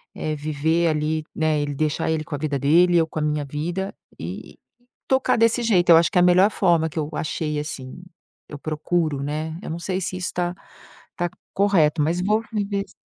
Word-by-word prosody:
é 155 0 -3
viver 155 +3 0
ali, 155 0 0
né, 155 -2 +1
ele 145 0 -2
deixar 155 +2 -1
ele 155 -1 -1
com 150 - -5
a - - -4
vida 145 -1 -2
dele, 170 +5 +4
eu 160 - +3
com 160 - -5
a - - -2
minha 150 -1 -1
vida 170 +7 -3 0.3
e - - -7
e - - -39 0.5
tocar 265 -2 +2
desse 230 +1 +3
jeito. 185 -6 +2
Eu 165 - +10
acho 165 -1 +3
que - - 0
é 180 - +6
a - - +5
melhor 185 +4 +5
forma 170 -5 +2
que 160 0 -4
eu 150 0 -2
achei, 150 -1 -2
assim, 135 0 -6 0.5
eu 145 - -7
procuro, 155 -1 -1
né. 155 +2 -3
Eu - - -7
não 165 +1 -4
sei 185 +2 -2
se 185 0 -3
isso 180 0 -3
tá 175 0 -1 0.6
tá 175 -1 -1 0.2
correto, 170 -7 +3
mas 165 +4 0
vou 215 +3 +2
viver 200 -2 -1
s - - -21
160 Hz, 215 wpm, -23 LUFS, 150-180 Hz, 0.6 s, Eu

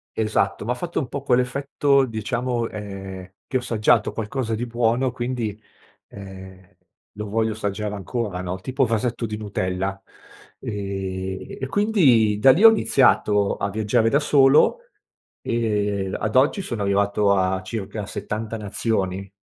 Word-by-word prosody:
Esatto, 110 -2 0
m'ha 120 - 0
fatto 170 +7 -6
un 135 - -3
po' 140 - -4
quell'effetto 140 +2 +2
diciamo, 120 +1 -2
ehm, 95 -3 -8
che 130 - -1
ho - - -1
assaggiato 115 -2 +2
qualcosa 115 +1 -3
di 120 +3 -3
buono 120 +2 +1
quindi, 120 -3 -3 0.5
ehm, 95 -1 -12 0.4
lo 105 0 -5
voglio 110 +1 0
assaggiare 105 0 -3
ancora 100 -1 -4
no, 90 +1 -4
tipo 130 +7 -1
vasetto 115 +1 -1
di 105 0 -5
Nutella, 95 -2 -3 0.6
ehm, 95 -2 -5
e 135 - -2
quindi 135 - +3
da 135 +5 +7
lì 170 +11 +2
ho 225 - +12
iniziato 105 - +3
a 100 - -2
viaggiare 110 +2 +1
da 140 - +3
solo 145 - +4 0.6
e 105 -4 -1
ad 110 +1 -3
oggi 140 +9 +3
sono 120 - -4
arrivato 100 +1 +2
a 95 -1 +1
circa 105 +1 -5
70 110 +2 -4
nazioni. 100 -2 -2
110 Hz, 140 wpm, -23 LUFS, 100-125 Hz, 0.6 s, ho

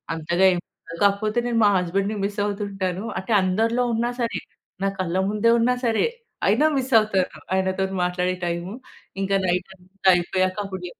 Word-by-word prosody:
అంతగా 170 +4 +1
ఏం 175 - -1 0.2
ఉండదు. 170 - -9
కాకపోతే 215 +3 +1
నేను 235 -1 +1
మా - - +6
హస్బెండ్‌ని 195 +4 -1
మిస్ 205 +1 -4
అవుతుంటాను. 195 -2 -3 0.2
అంటే 200 +4 -2
అందరిలో 225 +6 +1
ఉన్నా 235 +2 0
సరే 230 - -1 0.4
నా - - +2
కళ్ళ 180 0 -1
ముందే 210 +2 +2
ఉన్నా 240 +2 +3
సరే 225 - +2 0.4
అయినా 235 +10 +4
మిస్ 265 0 -2
అవుతాను. 195 -4 +1 0.3
ఆయనతో 190 0 0 0.2
మాట్లాడే 180 +1 0
టైము. 170 +2 -3 0.5
ఇంకా 195 0 +1
నైటంతా 185 +1 -3
అయిపోయాక 185 +2 0
అప్పుడు 190 -2 -6
చెప్ 175 - -13
195 Hz, 160 wpm, -23 LUFS, 185-215 Hz, 0.5 s, మా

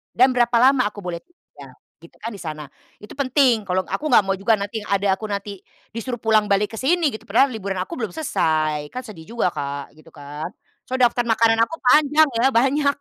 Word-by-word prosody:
dan 255 +2 +6
berapa 240 -1 +3
lama 260 -1 +5
aku 205 - -11
boleh 180 -2 -4
tinggal, 345 - -17 0.3
gitu - - -16
kan, 230 - -4
di - - -11
sana. 155 -2 -6 0.4
Itu 210 - -12
penting, 260 -4 +2
kalau 185 0 0
aku 305 - -4
enggak 205 - +6
mau 195 - +1
juga 205 +4 +2
nanti 205 +2 -4
yang - - -12
ada 200 0 +1
aku 220 - -7
nanti 200 -1 -5 0.4
disuruh 240 +1 -4
pulang 220 -2 +2
balik 205 +2 +1
ke - - -8
sini, 325 +4 +2
gitu, - - -10
padahal 250 +7 +3
liburan 200 -4 -4
aku 185 - -4
belum 220 -7 -4
selesai, 155 - -1
kan 255 - -5
sedih 165 -7 -11
juga 235 - +1
Kak, 140 +1 -5
gitu 155 +1 -18
kan. 145 +2 -7 0.4
Soalnya 255 -1 +3
daftar 245 0 -2
makanan 225 0 +3
aku 325 - -7
panjang 300 +3 +5
ya, 240 - +2
banyak 280 +4 +2
220 Hz, 210 wpm, -21 LUFS, 190-255 Hz, 0.4 s, dan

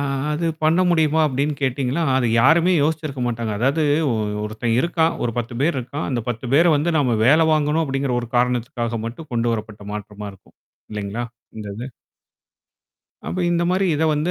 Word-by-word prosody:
அ - - 0 0.3
அது 160 +3 -1 0.2
பண்ண 160 +3 +3
முடியுமா? 160 -2 +3
அப்டின்னு 145 +2 -1
கேட்டீங்கன்னா, 135 +3 0
அது 130 -2 +2
யாருமே 165 +8 +5
யோசிச்சிருக்க 155 -3 -2
மாட்டாங்க. 115 -2 -2
அதாவது 135 +7 +1 0.3
ஒ - - +1 0.3
ஒருத்தன் 110 +2 -2
இருக்கான். 165 0 +1
ஒரு 115 - -1
10 120 +1 -4
பேர் 155 0 +1
இருக்கான். 130 +5 -4
அந்த 120 -3 -1
10 120 +1 -4
பேர 160 +4 +6
வந்து 165 +4 0
நாம 125 -5 +2
வேல 160 +5 +5
வாங்கணும் 155 +1 +2
அப்படிங்கிற 135 -2 -1
ஒரு 120 - -7
காரணத்துக்காக 120 -1 0
மட்டும் 150 +7 -8
கொண்டு 120 0 +1
வரப்பட்ட 110 -2 -5
மாற்றமா 105 0 -7
இருக்கும். 95 - -21 0.3
இல்லைங்களா? 105 +3 -4 0.3
இந்த 105 -1 -6
இது? 120 - -5 1.4
அப்ப 185 - -4
இந்த 170 0 +1
மாரி 190 +1 +1
இத 150 - -1
வந்து 150 +4 -1
135 Hz, 170 wpm, -21 LUFS, 115-155 Hz, 1.4 s, பேர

